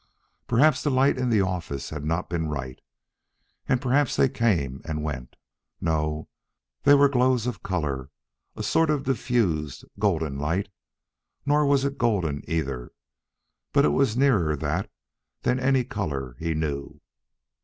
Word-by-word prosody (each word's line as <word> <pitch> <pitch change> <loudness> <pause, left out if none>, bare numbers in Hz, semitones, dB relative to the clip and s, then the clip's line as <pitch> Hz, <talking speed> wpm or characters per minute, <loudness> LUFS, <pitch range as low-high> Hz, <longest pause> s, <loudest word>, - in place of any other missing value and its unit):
Perhaps 145 +6 +4
the 150 - 0
light 135 +1 +3
in 125 -1 0
the 110 -4 +3
office 85 -7 -3
had 75 -2 -5
not 85 +4 -1
been 80 -2 -2
right, 70 -4 -5 0.9
and 130 -2 +3
perhaps 135 +1 +2
they - - +4
came 95 - 0
and 75 -2 -4
went. 65 -5 -5 0.4
No; 75 -1 -1 0.5
they 145 - +6
were 140 0 +6
glows 125 -3 +2
of 125 - -3
color 75 -7 -2 0.5
a - - -5
sort 165 -1 +2
of 145 -3 +1
diffused, 105 - 0
golden 80 -9 0
light. 80 +7 -1 0.8
Nor 145 0 +3
was 140 -1 +3
it 140 0 -3
golden, 90 -12 +1
either, 70 -7 -2 0.8
but - - +5
it - - +4
was 110 - +1
nearer 105 - +3
that 75 +6 -2 0.5
than 125 - +1
any 130 0 +2
color 70 - -4
he 80 -1 -1
knew. 70 -3 -3
90 Hz, 145 wpm, -25 LUFS, -, 0.9 s, they